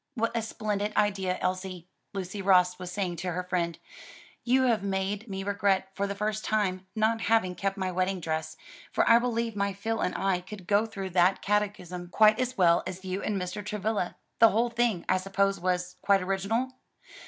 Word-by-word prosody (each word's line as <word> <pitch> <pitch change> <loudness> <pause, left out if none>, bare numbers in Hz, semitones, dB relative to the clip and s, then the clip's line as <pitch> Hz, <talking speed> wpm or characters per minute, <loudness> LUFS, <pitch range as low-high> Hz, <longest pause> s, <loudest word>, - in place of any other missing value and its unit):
"What 230 0 -1
a 230 - +1
splendid 210 -1 -2
idea, 190 -3 +1
Elsie," 185 -1 -3 0.2
Lucy 195 +1 -5
Ross 180 -2 +4
was 180 -1 -6
saying 180 -3 -2
to 180 +1 -3
her 180 +1 -2
friend, 175 -2 -1 0.7
"you 260 +2 +3
have 230 -5 +2
made 195 +3 -2
me 195 0 -4
regret, 200 -1 +1
for 200 +1 -1
the 200 - -4
first 215 +1 -2
time, 190 -3 0
not 220 +1 +1
having 220 -5 +2
kept 195 +2 -2
my 190 -1 -1
wedding 185 +1 0
dress; 160 -1 -3 0.3
for - - +2
I 230 0 +7
believe 235 -2 -1
my 200 -1 0
Phil 225 +3 -2
and - - -1
I 190 -2 0
could 185 0 -10
go 205 +4 +2
through 195 -3 -6
that 180 +2 +3
catechism 195 -4 -1
quite 215 +4 +5
as 255 0 -1
well 170 -2 +5
as 190 +1 -7
you 185 +1 -3
and 205 -2 -1
Mr. 180 +3 -4
Travilla. 210 -2 -2 0.2
The 225 - +8
whole 230 +3 +1
thing, 235 -7 0
I 185 - +3
suppose, 195 +1 0
was 180 0 -1
quite 200 -2 +3
original?" 200 +7 -1
195 Hz, 190 wpm, -28 LUFS, 185-215 Hz, 0.7 s, The